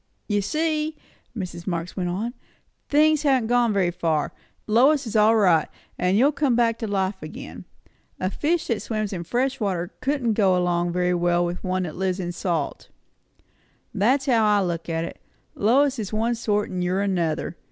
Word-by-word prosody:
"You 205 -2 +1
see," 310 +5 -1 0.4
Mrs. 175 -3 -6
Marx 170 -1 -3
went 180 -2 -2
on, 215 +7 -3 0.6
"things 305 +1 +4
haven't 265 -6 +2
gone 240 -2 +3
very 190 -4 +1
far. 160 -3 -1 0.3
Lois 265 +6 +4
is 225 - -6
all 215 +1 +5
right; 180 -7 +4 0.3
and 180 +2 +1
you'll 270 +6 +5
come 285 -4 +1
back 230 -1 +2
to 225 - -3
life 195 -1 -1
again. 155 - -9 0.5
A 185 +1 -1
fish 325 +7 0
that 230 -3 -1
swims 215 -3 -3
in 175 -2 -4
fresh 255 +8 -1
water 180 -5 -2
couldn't 260 -5 0
go 195 -4 +3
along 175 -1 +1
very 180 0 +1
well 175 0 +2
with 175 +1 -4
one 185 0 -1
that 160 -4 -5
lives 190 0 -1
in 175 -2 -3
the - - -5
salt. 170 -4 -3 1.0
That's 260 +7 +2
how 235 -5 +3
I 210 -2 +3
look 170 -1 -3
at 165 0 -1
it. - - -9 0.3
Lois 265 +5 +2
is 205 -3 -4
one 225 +2 0
sort, 210 -3 -1
and 180 -1 -2
you're 185 +2 0
another. 170 -5 -1
205 Hz, 185 wpm, -24 LUFS, 180-240 Hz, 1.0 s, all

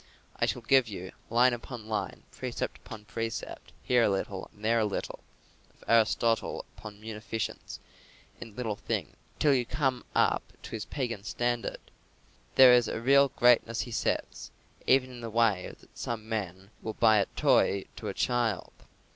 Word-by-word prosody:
I - - +1
shall 125 - -2
give 130 +1 +4
you 95 -3 -7 0.2
"line 120 +2 +4
upon 120 -2 -7
line, 110 -1 -3
precept - - -4
upon 105 -1 -10
precept, 115 +1 -5
here 125 -1 +3
a 115 - +4
little 95 -1 -3
and 105 +1 -11
there 115 +1 +3
a 110 - +2
little" 105 - -4 0.6
of - - -21
Aristotle 115 0 +2
upon 105 -1 -10
munificence 110 0 -5 0.6
in 110 - -10
little 115 -4 -2
things - - -3 0.2
till 145 -2 +4
you 125 -2 +2
come 130 0 -1
up - - +3 0.2
to - - -9
his 110 -2 -4
pagan 120 -7 -4
standard. 120 +1 -3 0.6
"There 130 -2 +9
is 120 -2 +5
a - - -3
real 140 +3 +5
greatness," 120 -2 +3
he 120 - -6
says, - - -2 0.4
"even 130 0 +4
in 120 -1 -10
the 115 - -5
way 110 -5 +1
that - - -22
some 110 -2 -5
men 100 -3 -4
will 110 - -4
buy 110 -2 +5
a 100 - +2
toy 100 0 +3
to - - -6
a - - -2
child. 120 -5 0
115 Hz, 165 wpm, -29 LUFS, 105-120 Hz, 0.6 s, There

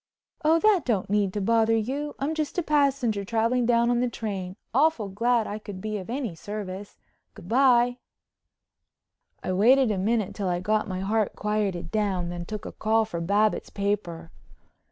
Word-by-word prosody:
"Oh, 315 +2 +5
that 395 -2 +3
don't 210 -6 -1
need 205 -2 +2
to 205 - -2
bother 225 +2 +3
you. 275 +7 -3
I'm 285 +3 -1
just 310 +1 -3
a 355 - +1
passenger 275 -8 +1
traveling 230 +3 +1
down 235 0 +3
on 240 - +2
the 250 0 +1
train. 195 -5 -5 0.2
Awful 270 -6 +2
glad 230 +3 +1
I 210 +1 -5
could 205 -3 -8
be 215 +1 -3
of 185 - -9
any 245 -5 -3
service. 200 +2 -7 0.4
Good 175 - -12
bye." 245 +1 +4 1.4
I 185 - -1
waited 245 +5 +4
a 195 - -1
minute 215 0 0
till 200 -3 -3
I 175 0 0
got 215 +4 0
my 185 -1 -4
heart 210 +1 0
quieted 200 -5 -2
down, 195 -5 0
then 175 0 -5
took 215 -1 -6
a - - -5
call 220 +1 +1
for 170 -6 -5
Babbitts' 205 +5 +1
paper. 185 -5 -3
215 Hz, 175 wpm, -26 LUFS, 195-245 Hz, 1.4 s, Oh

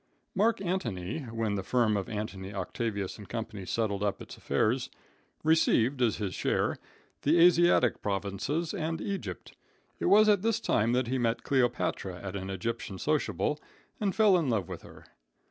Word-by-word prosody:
Mark 220 +4 +2
Antony, 120 - -2
when 115 -2 -2
the 100 - -1
firm 115 +1 +2
of 100 -2 -2
Antony, 100 -3 -5
Octavius 100 +1 -3
& - - -15
Co. 115 -2 -2 0.2
settled 100 -1 -1
up 105 -1 0
its - - -9
affairs, 110 - 0 0.5
received 145 -5 +3
as 115 -4 +3
his 100 -4 -3
share - - 0 0.4
the 155 +4 +3
Asiatic 175 -7 +5
provinces 105 - -2
and 165 -4 -2
Egypt. 200 +1 -5 0.4
It - - -2
was 215 +1 +6
at 205 -3 +4
this 225 0 +1
time 115 +3 +1
that 125 0 +2
he 130 +2 -1
met 115 -1 0
Cleopatra 120 -8 0
at 95 0 -6
an 95 -1 -4
Egyptian 95 0 -4
sociable 150 +2 0 0.4
and 200 -3 0
fell 215 -4 +5
in 155 -6 -1
love 105 -7 0
with - - -7
her. - - -14
115 Hz, 165 wpm, -29 LUFS, 100-160 Hz, 0.5 s, was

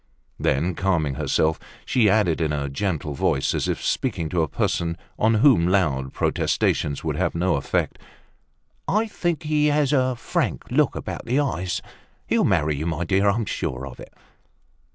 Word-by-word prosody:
Then 80 +7 +1
calming 80 -6 0
herself, 80 +3 +1 0.3
she 115 -5 +3
added 95 -6 +2
in 80 -2 +1
a 70 -1 -2
gentle 75 -1 -2
voice, 65 0 +1
as - - -1
if - - -2
speaking 80 -2 -1
to 85 0 +1
a 80 - +1
person 85 +4 -1 0.2
on 110 +1 +3
whom 110 - +5
loud 75 -9 +1
protestations 70 -1 0
would - - -1
have - - 0
no 90 +2 +1
effect, 70 - -1 0.9
"I 215 +3 +2
think 175 -6 -2
he 150 -1 +2
has 150 -1 +2
a 130 -2 +2
frank - - -2
look - - +2
about - - -5
the 125 +4 +1
eyes. 95 -11 -1 0.4
He'll - - +2
marry 75 0 +2
you, 80 +3 -3
my 85 +1 -1
dear, 100 +3 +3
I'm 110 +3 0
sure 65 -8 -3
of 65 -3 -10
it." - - -11
90 Hz, 170 wpm, -23 LUFS, 75-115 Hz, 0.9 s, whom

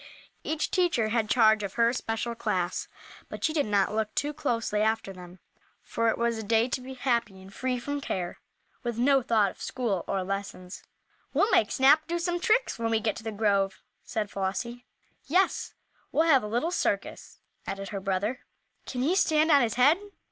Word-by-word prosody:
Each 310 -1 -2
teacher 340 -12 +2
had 220 -1 0
charge 220 -3 +5
of 200 -2 -5
her 235 0 +3
special 230 -1 -3
class, 185 -6 -2 0.4
but - - -8
she 315 - +1
did 295 -7 +1
not 200 -1 +1
look 215 -1 -2
too 295 +1 -1
closely 235 -8 -1
after 220 -2 0
them, 180 0 -12 0.5
for 230 0 -1
it - - 0
was 235 -1 0
a - - -5
day 225 +2 +2
to 255 - -2
be 260 +1 -8
happy 235 -7 -1
and 190 +1 -14
free 255 +2 -2
from 285 +4 -4
care, 180 -9 -4 0.4
with 240 -3 -3
no 270 +3 +4
thought 220 -5 +2
of - - -18
school 220 -9 -2
or 195 -1 -1
lessons. 195 -1 -5 0.5
"We'll 420 - +3
make 215 - +4
Snap 285 +4 +5
do 345 0 -1
some 350 0 -1
tricks 455 - +1
when 230 0 0
we 225 -1 +2
get 220 0 -1
to - - -9
the 225 - -3
grove," 200 -2 0 0.2
said 215 -3 -3
Flossie. 215 +6 -4 0.4
"Yes, 365 +7 +1 0.4
we'll 315 - +3
have 280 -6 +5
a 210 - -5
little 240 +10 -1
circus," - - -2 0.3
added 195 0 -4
her 200 - -4
brother. 195 +5 -1 0.5
"Can 250 -1 -2
he 315 +6 +2
stand 315 -3 +3
on 285 -2 +7
his 230 -3 0
head?" 285 +8 +5
230 Hz, 190 wpm, -28 LUFS, 205-270 Hz, 0.5 s, on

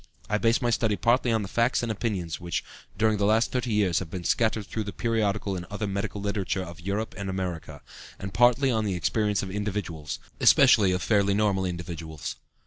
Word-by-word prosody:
I 105 +1 0
base 115 +3 +2
my 120 - +2
study 110 -2 +1
partly 120 +5 +2
on 110 -2 +1
the - - -5
facts 120 +5 +1
and 115 - -1
opinions 95 -8 -3
which 85 -2 -3 0.3
during 110 +1 +2
the 100 - +2
last 110 +2 +3
thirty 125 -2 -1
years 100 -5 +2
have 95 - -6
been 90 +1 -6
scattered 110 +1 +1
through 110 +1 -4
the 100 - -4
periodical 105 -2 -1
and 90 - -4
other 105 +3 -4
medical 100 +1 -3
literature 100 -2 -2
of 85 0 -10
Europe 100 +4 -3
and 100 -1 -3
America, 90 -6 -5 0.3
and 95 0 -7
partly 125 +3 +4
on 110 -2 +1
the 100 -3 -1
experience 105 +3 0
of 95 - -5
individuals, 100 -7 -3 0.2
especially 115 -8 +6
of 90 0 -1
fairly 100 -2 +2
normal 100 -3 +1
individuals. 85 -4 -5
100 Hz, 200 wpm, -27 LUFS, 95-110 Hz, 0.3 s, especially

